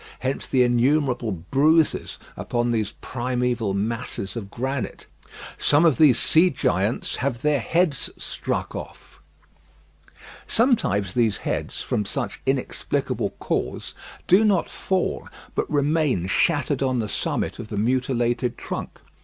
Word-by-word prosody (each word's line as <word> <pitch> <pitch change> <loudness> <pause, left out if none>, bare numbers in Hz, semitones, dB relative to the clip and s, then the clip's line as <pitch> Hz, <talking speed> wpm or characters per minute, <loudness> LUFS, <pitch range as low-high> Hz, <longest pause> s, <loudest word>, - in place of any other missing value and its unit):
Hence 130 +1 -2
the 130 -1 +3
innumerable 125 -1 +2
bruises 140 - +2 0.2
upon 120 0 -1
these 110 -3 -1
primeval 125 -4 -1
masses 105 -1 -3
of 105 -4 -5
granite. 130 0 -4 0.5
Some 145 +3 +4
of 160 -2 +3
these 145 -6 +6
sea 170 +3 +4
giants 105 - 0
have 125 -2 -2
their 150 -2 +3
heads 165 +2 +1
struck - - -3
off. - - -9 1.3
Sometimes 105 - +2
these 115 -5 +2
heads, - - -2
from 105 - -1
some 115 0 -3 0.2
inexplicable 135 -1 -1
cause, - - -3 0.3
do 190 +5 +5
not 200 -5 +2
fall, 190 -1 -1 0.2
but - - -1
remain 145 - +1
shattered 140 - +1
on 130 -2 +1
the 110 -3 -1
summit - - -2
of - - -6
the 105 - -5
mutilated 120 +1 0
trunk. - - -5
125 Hz, 125 wpm, -24 LUFS, 115-145 Hz, 1.3 s, these